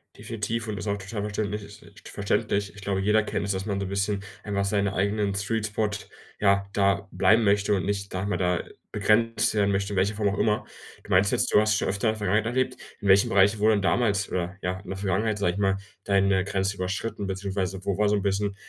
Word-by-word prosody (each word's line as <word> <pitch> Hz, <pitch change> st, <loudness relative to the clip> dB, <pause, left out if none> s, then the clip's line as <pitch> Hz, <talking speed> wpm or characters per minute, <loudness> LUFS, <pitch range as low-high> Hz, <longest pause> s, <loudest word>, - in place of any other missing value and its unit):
Definitiv 115 Hz, +1 st, -4 dB
und 105 Hz, -2 st, -3 dB
ist -, -, -6 dB
auch 100 Hz, 0 st, 0 dB
total 100 Hz, +1 st, -5 dB
verständlich 105 Hz, 0 st, -2 dB
es -, -, -13 dB
i -, -, -16 dB
verständlich. 100 Hz, 0 st, -1 dB
Ich 105 Hz, -, -11 dB
glaube, 95 Hz, -1 st, -1 dB
jeder 105 Hz, +2 st, +3 dB
kennt 100 Hz, -, -2 dB
es, 100 Hz, -, -1 dB
dass 95 Hz, +1 st, -3 dB
man 100 Hz, -1 st, -1 dB
so 100 Hz, -, -2 dB
'n -, -, -5 dB
bisschen 100 Hz, 0 st, -1 dB, 0.2 s
einfach 100 Hz, -1 st, -1 dB
seinen 100 Hz, 0 st, +1 dB
eigenen 100 Hz, +1 st, 0 dB
Sweet 105 Hz, +2 st, -1 dB
Spot, 105 Hz, 0 st, -1 dB, 0.5 s
ja, 100 Hz, -1 st, +3 dB
da 100 Hz, -1 st, +1 dB
bleiben 110 Hz, +1 st, +4 dB
möchte 100 Hz, 0 st, +3 dB
und 95 Hz, -, -1 dB
nicht, 100 Hz, -1 st, -2 dB
sage 95 Hz, +2 st, -2 dB
mal, 105 Hz, -, 0 dB
da 90 Hz, -1 st, 0 dB, 0.3 s
begrenzt 110 Hz, +2 st, +2 dB
werden 100 Hz, -2 st, +2 dB
möchte, 100 Hz, +1 st, -1 dB
in -, -, -3 dB
welcher 100 Hz, +3 st, +1 dB
Form 105 Hz, -2 st, +1 dB
auch 100 Hz, -, -3 dB
immer. 105 Hz, -1 st, +1 dB, 0.4 s
Du -, -, -11 dB
meinst 95 Hz, +2 st, +4 dB
jetzt -, -, +1 dB
du -, -, +7 dB
hast 105 Hz, -1 st, +2 dB
schon -, -, -1 dB
öfter 100 Hz, +3 st, 0 dB
in -, -, +4 dB
der -, -, -8 dB
Vergangenheit 105 Hz, +1 st, +1 dB
erlebt. 130 Hz, +1 st, 0 dB, 0.2 s
In 100 Hz, -, -4 dB
welchem 100 Hz, +1 st, +6 dB
Bereich 100 Hz, +2 st, +4 dB
wurde 110 Hz, +1 st, +4 dB
denn 100 Hz, -, 0 dB
damals, 105 Hz, -2 st, +2 dB
oder 90 Hz, +1 st, -2 dB
ja, 90 Hz, +1 st, -2 dB
in 100 Hz, -, -13 dB
der 95 Hz, -, -4 dB
Vergangenheit, 100 Hz, +3 st, 0 dB
sage 90 Hz, -3 st, +1 dB
ich 100 Hz, -, -5 dB
mal, 95 Hz, -1 st, +2 dB, 0.3 s
deine 100 Hz, -1 st, +2 dB
Grenze 95 Hz, 0 st, -1 dB
überschritten, 100 Hz, +2 st, -3 dB
beziehungsweise 95 Hz, -1 st, -3 dB
wo 100 Hz, -1 st, 0 dB
war 105 Hz, -1 st, +3 dB
so 105 Hz, -, +3 dB
'n 100 Hz, -, 0 dB
bisschen 100 Hz, 0 st, 0 dB
100 Hz, 240 wpm, -26 LUFS, 95-105 Hz, 0.5 s, du